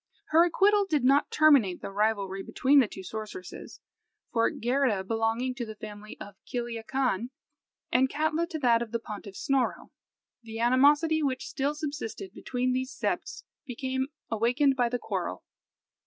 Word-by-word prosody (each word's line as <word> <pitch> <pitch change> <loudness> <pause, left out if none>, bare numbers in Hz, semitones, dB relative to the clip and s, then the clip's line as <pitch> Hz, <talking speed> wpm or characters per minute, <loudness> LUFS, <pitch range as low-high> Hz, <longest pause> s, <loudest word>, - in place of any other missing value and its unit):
Her 330 +2 +6
acquittal 405 +3 +3
did 295 -5 +1
not 275 +3 +4
terminate 275 - +4
the - - -5
rivalry 200 -2 0
between 275 +8 +3
the 250 - +4
two 190 - -9
sorceresses, 210 -2 -8 0.5
for, 230 -1 +3
Geirrida 240 -4 0
belonging 225 +4 -1
to 250 -1 -5
the 220 -2 -7
family 210 0 -9
of 205 - -9
Kiliakan, 240 -1 -2 0.6
and 260 +1 +3
Katla 315 +3 0
to 335 -3 -5
that 235 -5 +3
of 235 -2 -5
the 235 - 0
pontiff 205 -3 -8
Snorro, 270 +3 -1 0.5
the 225 -1 -8
animosity 290 +6 +4
which 265 -3 -1
still 280 +2 -1
subsisted 300 - -5
between 250 0 -2
these 260 +1 -2
septs - - -3 0.2
became 260 +1 -2 0.2
awakened 250 +5 +2
by 245 -2 +2
the 245 - -1
quarrel. - - -4
250 Hz, 150 wpm, -28 LUFS, 225-280 Hz, 0.6 s, Her